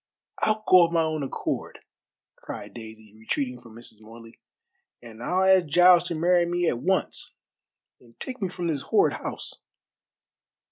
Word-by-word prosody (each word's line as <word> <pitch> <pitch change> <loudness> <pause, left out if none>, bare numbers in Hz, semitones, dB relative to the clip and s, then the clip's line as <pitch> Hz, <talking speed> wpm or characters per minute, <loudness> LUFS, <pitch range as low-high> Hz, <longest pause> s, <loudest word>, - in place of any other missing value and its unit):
"I'll 215 0 +1
go 185 -1 +7
of - - -11
my 165 -1 +2
own 155 -1 -2
accord," 135 - -4 0.6
cried - - -9
Daisy, 110 -2 -12
retreating 125 +3 -3
from 115 -2 -15
Mrs. 115 -2 -12
Morley; 115 +1 -14 0.6
"and 115 -1 -13
I'll 180 +9 0
ask 190 -3 +4
Giles 175 +3 +5
to 170 - -3
marry 175 +2 +2
me 175 0 0
at 120 - 0
once, 190 +7 -2 0.6
and 115 -2 -23
take 255 -3 -7
me 190 - -1
from 175 -1 -6
this 155 -5 -1
horrid - - +2
house. - - -6
160 Hz, 155 wpm, -25 LUFS, 115-180 Hz, 0.6 s, go